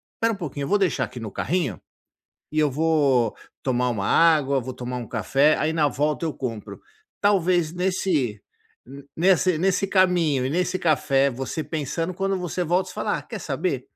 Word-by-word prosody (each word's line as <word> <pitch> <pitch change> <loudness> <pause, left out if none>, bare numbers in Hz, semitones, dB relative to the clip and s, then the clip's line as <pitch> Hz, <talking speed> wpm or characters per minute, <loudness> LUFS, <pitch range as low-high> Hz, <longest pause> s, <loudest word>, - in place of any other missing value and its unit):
"Espera 225 0 +1
um - - -4
pouquinho, 145 -6 -5
vou 205 - +3
deixar 190 -6 +1
aqui 125 - -10
no 110 -3 -6
carrinho, 155 - -2 0.7
e 155 - -1
eu 150 -2 +3
vou 140 -6 +2 0.3
tomar 125 -1 0
uma 100 -4 -2
água, 150 -5 +4
vou 130 +1 -6
tomar 125 0 -5
um 120 - -7
café, 135 +7 +2
aí 155 +1 0
na 155 -2 +2
volta 150 +4 -1
eu 155 - -3
compro". 115 -5 -6 0.4
Talvez 180 -5 +2
nesse 175 - -1 0.7
nesse 185 0 +3
nesse 195 +3 +1
caminho 180 -8 +2
e - - -2
nesse 180 +3 0
café, 140 -4 +2
você 135 +5 -4
pensando 160 +3 -3
quando 195 +1 -1
você 180 0 -3
volta 175 +3 +1
você - - -10
fala: - - -1
"Ah - - -8
quer - - -7
saber? - - -3
155 Hz, 175 wpm, -24 LUFS, 130-180 Hz, 0.7 s, água